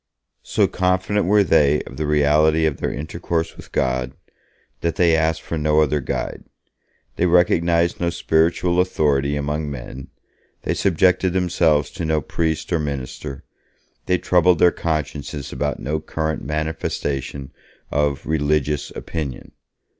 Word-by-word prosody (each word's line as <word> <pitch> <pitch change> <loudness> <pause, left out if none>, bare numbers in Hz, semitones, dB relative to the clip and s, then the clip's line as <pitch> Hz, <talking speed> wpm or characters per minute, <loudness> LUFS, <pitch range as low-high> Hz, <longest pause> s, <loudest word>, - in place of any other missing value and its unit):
So - - +1
confident 95 +2 0
were 105 +1 +5
they 75 -4 +3
of 65 - -11
the 75 - -2
reality 75 +2 +3
of 75 -3 0
their - - -2
intercourse 80 +3 -3
with - - -13
God, 65 0 -1 0.7
that 85 -1 -1
they 85 -2 +4
asked 80 0 0
for 80 - -3
no 75 0 +2
other 75 -1 +2
guide. - - -4 0.7
They 90 - +2
recognized 85 -1 +2
no 85 - +1
spiritual 85 +2 +1
authority 75 -6 +1
among 75 +1 -2
men, 65 -1 -8 0.6
they - - 0
subjected 90 0 +2
themselves 85 -5 +2
to - - -6
no 80 -1 +1
priest 80 +2 -2
or 85 - +2
minister, 70 -1 -5 0.6
they 90 - +3
troubled 90 0 +3
their 90 +2 +5
consciences 75 -2 -3
about 75 -1 -2
no 75 +3 -2
current 80 0 -3
manifestation 75 -3 -3 0.4
of 70 -1 0
'religious 75 -1 0
opinion'. 75 -6 -5
80 Hz, 135 wpm, -21 LUFS, 75-85 Hz, 0.7 s, were